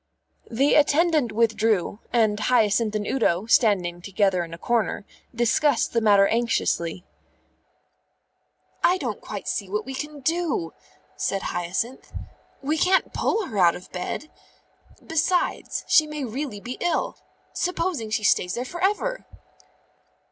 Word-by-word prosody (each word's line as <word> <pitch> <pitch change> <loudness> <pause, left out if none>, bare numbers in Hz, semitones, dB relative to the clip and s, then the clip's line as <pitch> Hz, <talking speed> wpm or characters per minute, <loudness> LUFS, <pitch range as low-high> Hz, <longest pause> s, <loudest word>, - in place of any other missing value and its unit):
The 270 +5 +2
attendant 300 -3 +3
withdrew, 220 -3 +1
and 215 -3 +2
Hyacinth 220 -1 +2
and 210 -1 -1
Udo, 205 -7 +1
standing 190 -7 +2
together 190 -1 +1
in 165 - -9
a 165 - -7
corner, 225 0 -1 0.3
discussed 240 +3 +2
the 230 - +2
matter 205 -2 +5
anxiously. 190 -7 0 1.8
"I 360 - +4
don't 245 - -4
quite 205 -2 -7
see 200 -3 -2
what 210 +2 -2
we 265 - -6
can 295 +1 -6
do," 320 - -1 0.4
said 195 - -2
Hyacinth. 185 +9 -3 0.5
"We 305 +3 0
can't 375 +1 +2
pull 435 -2 0
her 215 - -4
out 170 -2 +5
of 180 - -11
bed. 185 +11 -5 0.7
Besides, 345 +3 0
she 310 -1 +5
may 300 -1 -5
really 250 -2 -4
be 245 +4 -7
ill. 345 -2 -1 0.4
Supposing 345 -9 -2
she 215 0 -1
stays 180 -3 +2
there 245 - -3
for 345 +7 -6
ever!" - - 0
230 Hz, 135 wpm, -24 LUFS, 200-300 Hz, 1.8 s, matter